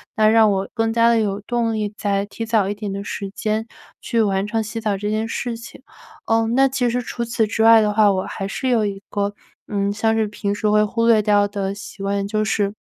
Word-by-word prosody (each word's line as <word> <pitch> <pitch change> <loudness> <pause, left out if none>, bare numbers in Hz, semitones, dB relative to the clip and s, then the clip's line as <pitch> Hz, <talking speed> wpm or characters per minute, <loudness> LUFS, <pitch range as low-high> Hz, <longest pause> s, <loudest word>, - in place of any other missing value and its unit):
那 215 -2 +4
让 220 0 +5
我 195 0 -1
更 225 -1 0
加 230 0 +4
地 230 - +3
有 205 -2 -1
动 230 +1 -1
力 210 -1 -2
再 200 -2 -1
提 210 +2 -7
早 220 -3 +1
一 200 - -1
点 205 -1 -5
的 200 +1 -4
时 200 -1 -5
间 220 +1 -2 0.3
去 230 -2 +1
完 195 -1 0
成 225 0 -1
洗 220 +1 -5
澡 210 -3 -1
这 205 +2 -3
件 215 +1 -1
事 235 +1 -3
情。 230 +2 -12 0.4
嗯， 225 +1 +1
那 270 +1 +5
其 260 -2 0
实 245 +1 -1
除 235 0 -4
此 230 -1 0
之 220 +1 -2
外 225 0 +7
的 210 -1 +1
话， 210 -1 +5
我 190 -1 -1
还 195 - -5
是 260 +6 -3
有 235 -3 +2
一 195 -1 -4
个 205 0 -2 0.4
嗯， 200 -1 0
像 220 +2 +1
是 220 -1 +1
平 205 -1 -3
时 210 0 0
会 210 0 +4
忽 230 +2 0
略 225 -2 +5
掉 205 -1 +3
的 200 -1 -3
习 205 0 -10
惯， 200 0 -1
就 215 +1 -1
是 205 -2 0
215 Hz, 260 characters per minute, -21 LUFS, 205-225 Hz, 0.4 s, 外